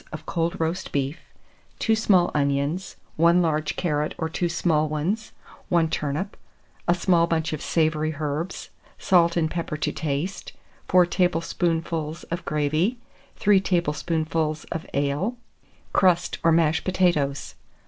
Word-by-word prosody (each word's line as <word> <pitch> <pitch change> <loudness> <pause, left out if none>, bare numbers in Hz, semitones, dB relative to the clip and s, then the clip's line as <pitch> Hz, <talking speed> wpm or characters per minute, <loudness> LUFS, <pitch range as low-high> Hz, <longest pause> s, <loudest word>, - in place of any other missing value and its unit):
of 155 0 -8
cold 170 +2 -1
roast 165 +3 -2
beef, 140 +3 -1 0.6
2 225 - +2
small 190 -5 +3
onions, 140 +5 0 0.2
1 170 +2 +5
large 155 -3 0
carrot 150 -3 -1
or 160 - -1
two 170 +2 -1
small 160 -3 +1
ones, 180 +9 -2 0.4
1 170 -3 +2
turnip, 150 +8 -2 0.5
a 175 - +4
small 175 -1 +3
bunch 160 -2 -1
of 155 - -4
savoury 155 -1 0
herbs, 155 +4 -4 0.3
salt 170 -2 +3
and 160 -2 +1
pepper 170 -3 -3
to - - -1
taste, 155 +5 -3 0.3
4 180 -1 +5
tablespoonfuls 165 -2 -1
of 170 +2 -3
gravy, 155 - 0 0.4
3 205 -2 +4
tablespoonfuls 160 -2 -1
of 165 -1 -4
ale, 145 - 0 0.6
crust 180 -2 +2
or 165 - +5
mashed 160 -1 +3
potatoes. 170 -7 0
165 Hz, 130 wpm, -24 LUFS, 155-175 Hz, 0.6 s, 1